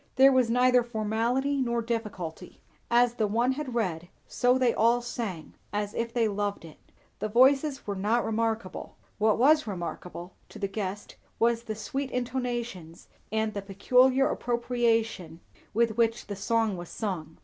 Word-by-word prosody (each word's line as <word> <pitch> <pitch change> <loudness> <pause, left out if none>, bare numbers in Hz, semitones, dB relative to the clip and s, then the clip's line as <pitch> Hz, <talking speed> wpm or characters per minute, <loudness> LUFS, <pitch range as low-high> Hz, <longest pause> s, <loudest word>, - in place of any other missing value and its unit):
There 270 +1 +7
was 255 -3 +3
neither 250 +1 +4
formality 240 +5 -1
nor 235 -2 0
difficulty; 200 -7 -5 0.3
as 240 0 +4
the 220 -3 0
one 235 +5 +1
had 265 -2 -4
read, 175 -7 -2 0.2
so 250 +1 +2
they 250 -2 +2
all 235 +2 +3
sang, 225 -8 -5 0.2
as 205 0 -2
if 230 0 -2
they 230 -2 +1
loved 205 -3 -3
it. 155 - -13 0.4
The 215 - -2
voices 270 +5 +3
were 200 - -3
not 215 +5 +1
remarkable; 225 -3 -2 0.2
what 215 0 +3
was 300 +3 +4
remarkable, 175 -1 -6 0.2
to - - -11
the 200 - -2
guest, 195 0 -5 0.2
was 230 0 +2
the 220 -2 -5
sweet 265 +6 -4
intonations 240 -9 -4 0.2
and 220 0 0
the 200 - -3
peculiar 250 +7 +3
appropriation 230 -8 -1 0.3
with 230 0 +1
which 230 0 +1
the 205 - -5
song 220 0 0
was 175 -1 -8
sung. 165 -7 -5
230 Hz, 155 wpm, -28 LUFS, 205-245 Hz, 0.4 s, There